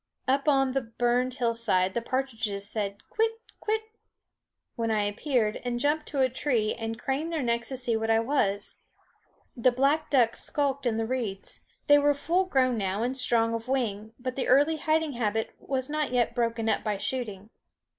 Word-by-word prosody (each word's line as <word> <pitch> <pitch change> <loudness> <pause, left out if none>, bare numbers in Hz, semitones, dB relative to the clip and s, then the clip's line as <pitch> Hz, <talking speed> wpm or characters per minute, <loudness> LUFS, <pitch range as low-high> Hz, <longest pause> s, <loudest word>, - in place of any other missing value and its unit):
Up 275 +3 +1
on 270 -2 +3
the 270 +1 0
burned 245 +2 0
hillside 230 -7 +1
the 235 - -1
partridges 225 -6 -2
said, 200 -2 -4
quit, 450 +1 +1 0.3
quit! 440 +1 -1 0.9
when 230 -1 -1
I 215 -2 +2
appeared, 215 +1 0
and 245 -1 -2
jumped 295 +3 +1
to 280 -2 -1
a 260 - +5
tree 245 -4 0
and 225 0 -4
craned 285 +7 -2
their 320 -4 -1
necks 235 -1 0
to 265 - -3
see 245 -2 +1
what 225 0 -1
I 225 0 +4
was. 225 -5 -1 0.7
The 250 0 +3
black 280 +5 +1
ducks 240 -5 +3
skulked 280 -2 0
in 225 -2 0
the 225 - 0
reeds. 220 -6 -4 0.3
They 290 0 +7
were 290 0 +3
full 350 +6 +1
grown 255 -8 +2
now 195 +2 -1
and 250 +2 -1
strong 230 -3 +2
of 230 +1 -4
wing, 225 -4 -2
but 255 0 -4
the 270 - -2
early 290 +5 +4
hiding 315 0 +1
habit 225 -2 -1
was 260 -1 -2
not 300 -1 -1
yet 240 -2 +1
broken 230 -2 -1
up 220 - +1
by 210 -2 -1
shooting. 215 -3 -4
245 Hz, 185 wpm, -28 LUFS, 225-275 Hz, 0.9 s, They